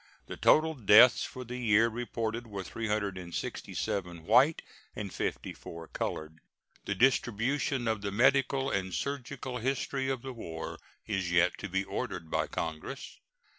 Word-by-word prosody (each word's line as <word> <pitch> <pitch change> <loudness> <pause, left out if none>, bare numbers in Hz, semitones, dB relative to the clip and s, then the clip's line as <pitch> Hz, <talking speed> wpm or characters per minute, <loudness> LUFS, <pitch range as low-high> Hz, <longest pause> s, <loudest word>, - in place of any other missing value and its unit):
The - - -7
total 160 +1 +4
deaths 115 -1 +7
for 130 - -7
the 125 +1 -6
year 110 -1 +4
reported 115 0 -3
were 100 -3 -5
367 95 -4 -3
white 140 - +5 0.3
and - - -5
54 85 -1 -5
colored. 80 +1 -4 0.5
The 100 - -1
distribution 125 +2 +1
of 110 -3 0
the 100 0 -3
Medical 135 +4 +3
and 95 -2 -1
Surgical 130 -2 -4
History 135 +2 -1
of 130 -3 -2
the 135 -1 -5
War 80 -8 -6 0.3
is 95 -4 -1
yet 85 +1 +4
to - - -5
be 95 +2 0
ordered 95 -5 -5
by - - +1
Congress. 80 -1 -5
115 Hz, 135 wpm, -30 LUFS, 95-130 Hz, 0.5 s, deaths